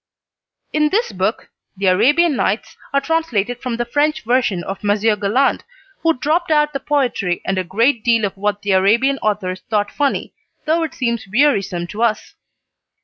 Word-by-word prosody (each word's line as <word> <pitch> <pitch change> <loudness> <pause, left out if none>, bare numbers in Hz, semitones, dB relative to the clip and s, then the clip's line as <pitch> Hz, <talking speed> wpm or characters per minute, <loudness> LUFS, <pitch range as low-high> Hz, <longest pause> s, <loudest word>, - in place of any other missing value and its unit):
In 300 0 +2
this 455 +7 0
book - - -2 0.3
"The 195 - -2
Arabian 280 - +4
Nights" 210 -2 -1 0.2
are 280 - +3
translated 245 -8 -1
from 245 -3 -3
the 240 - -1
French 295 +5 0
version 225 -6 +1
of 195 +4 -6
Monsieur 210 +1 +2
Galland, 210 +7 +1 0.4
who 330 0 +2
dropped 320 +7 0
out 300 -1 +2
the 275 - -2
poetry 255 -11 0
and 190 -1 0
a - - -1
great 225 +6 +1
deal 230 -3 +3
of 195 - -4
what 205 +1 -2
the 205 - 0
Arabian 230 +9 +3
authors 195 -3 -2
thought 205 -2 0
funny, 285 -2 -1 0.3
though 320 +2 +1
it 320 -3 -3
seems 235 -4 -2
wearisome 205 -9 +1
to 205 +6 -7
us. 225 -3 0
235 Hz, 170 wpm, -19 LUFS, 205-290 Hz, 0.4 s, Arabian